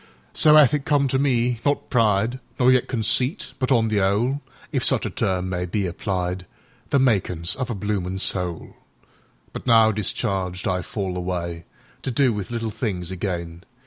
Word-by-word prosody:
So 155 0 +5
'ath 150 -2 +6
it 145 -2 0
come 140 -1 +2
to 130 - +1
me—not 125 0 0
pride, 115 0 +2 0.2
Nor 125 0 +4
yet 125 -1 +2
conceit, 125 - +2
but 130 0 -1
on 115 -3 +3
the 105 -2 +1
'ole(If 115 +9 -2
such - - +1
a - - -3
term 95 -1 -1
may 90 -1 -3
be 100 +3 -1
applied),The 90 +6 -4
makin's 95 -10 +2
of 130 -1 -4
a 120 - -2
bloomin' 95 -2 -3
soul. 90 -3 -1 0.8
But - - -8
now, 115 -2 +6
discharged, 95 -3 -2
I 90 0 0
fall 95 0 -4
awayTo 85 +7 -6
do 130 -3 +3
with 105 -3 -5
little 115 -2 -3
things 100 -5 -4
again. 85 -2 -4
105 Hz, 155 wpm, -23 LUFS, 90-125 Hz, 0.8 s, ath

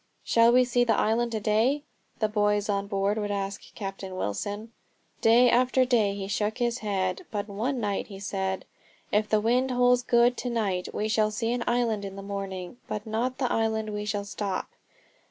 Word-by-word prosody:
"Shall 230 0 +5
we 250 +1 +5
see 245 0 +2
the 235 - +2
island 230 +2 +1
to 220 - 0
day?" 225 +7 +2 0.3
the 215 - +1
boys 210 -1 +1
on 200 0 0
board 200 +1 0
would 205 -1 -2
ask 200 -1 -3
Captain 195 -2 -6
Wilson. 205 - -3 0.5
Day 235 +2 +6
after 255 +1 +3
day 220 -6 +2
he 195 -1 -4
shook 210 +2 -1
his 240 0 0
head. 190 -3 -2
But 205 -1 -3
one 230 +6 -2
night 205 -3 -2
he 195 - -9
said: 190 -1 -3 0.5
"If 210 +1 +1
the 215 - +3
wind 245 +4 +2
holds 250 0 +4
good 240 0 +3
to 250 - -3
night 200 -6 -1
we 210 - -2
shall 215 0 +2
see 225 +2 -2
an 245 -1 -1
island 235 -4 +1
in 195 -1 -6
the 195 - -7
morning, 195 0 -5
but 210 0 -4
not 235 +4 -1
the 255 -3 0
island 220 -1 0
where 210 - -4
we 210 - -4
shall 205 -1 -2
stop." 200 -2 -3
215 Hz, 195 wpm, -27 LUFS, 200-240 Hz, 0.5 s, Day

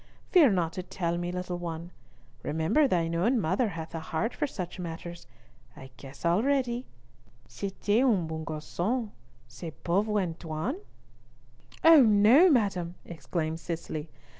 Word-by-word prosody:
Fear 335 -8 +7
not 170 -3 0
to 185 - -4
tell 175 -1 -3
me, 175 0 -3
little 180 0 -4
one. 170 0 -6 0.5
Remember 160 - +2
thine 170 -7 0
own 225 +9 +2
mother 195 +6 +1
hath 165 -3 -7
a 165 - -3
heart 160 +8 -2
for 295 - -1
such 185 -7 -6
matters. 170 -3 -7 0.5
I 130 -1 -11
guess 135 +4 -11
already. 245 +6 +1 0.6
C'etait 205 +3 -1
un 210 -10 +3
beau 160 0 -5
garcon, 175 +9 -3 0.4
ce 120 +9 -10 0.2
pauvre 205 +4 +1
Antoine." 165 - -3 1.1
"Oh 325 -2 +9
no, 225 - +6
madam," 195 - +1
exclaimed 160 +1 -4
Cicely. 160 -2 -5
175 Hz, 135 wpm, -28 LUFS, 165-220 Hz, 1.1 s, Oh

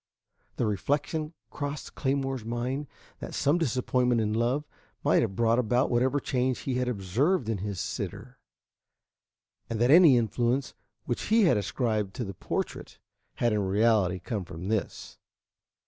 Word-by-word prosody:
The 120 - 0
reflection 145 - -1 0.2
crossed 145 0 -5
Claymore's 135 -2 -1
mind 125 +5 -3 0.3
that - - -7
some 150 +5 +2
disappointment 125 -4 +1
in 105 -1 0
love 120 +6 0 0.4
might - - +4
have 95 - -2
brought 115 +2 +3
about 125 +3 +1
whatever 130 +4 +2
change 130 -1 -1
he 135 - -2
had 125 - 0
observed 120 - 0
in 110 -3 -1
his 100 -1 -4
sitter, - - -5 1.3
and 115 -2 -3
that 120 +3 +4
any 160 -5 +8
influence 120 +4 0 0.3
which 120 - -2
he 220 +1 +4
had 175 - +5
ascribed 105 -1 -1
to 125 - -3
the 100 -3 -5
portrait - - -4 0.4
had 120 -2 +1
in 105 - +1
reality 100 -1 +2
come 100 +2 -4
from 85 +2 -7
this. 110 -2 -3
120 Hz, 145 wpm, -28 LUFS, 105-135 Hz, 1.3 s, any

